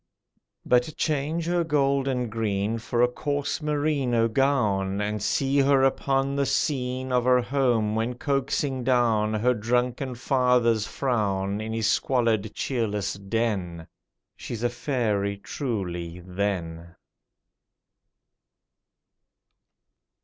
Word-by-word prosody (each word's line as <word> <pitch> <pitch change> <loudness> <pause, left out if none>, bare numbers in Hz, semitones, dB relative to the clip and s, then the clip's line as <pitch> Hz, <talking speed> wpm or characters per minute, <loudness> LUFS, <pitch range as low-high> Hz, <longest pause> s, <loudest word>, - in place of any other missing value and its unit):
But 125 +5 +2
change 155 +2 -1
her 175 0 +1
gold 140 -3 +1
and 125 -4 -1
green 110 0 -1
For 120 +2 0
a - - +6
coarse 145 +4 -3
merino 145 -6 +1
gown, 110 -7 +1
And 105 0 -2
see 135 +7 +1
her 135 -1 +4
upon 135 +1 +1
the 140 0 +1
scene 130 -2 -1
Of 125 -1 +2
her 125 0 +5
home, 120 -5 +1
when 115 +3 -1
coaxing 135 -1 -1
down 115 -4 +2
Her 120 +4 +2
drunken 125 +3 -1
father's 125 -4 +2
frown, 100 -6 -1
In 110 +1 -4
his 115 -1 -1
squalid 110 -2 +1
cheerless 110 -6 -1
den: 100 -5 -2 0.5
She's 115 -1 -6
a 120 - +2
fairy 110 -6 -1
truly, 90 - -4
then! 85 -3 -3
120 Hz, 110 wpm, -25 LUFS, 105-135 Hz, 0.5 s, a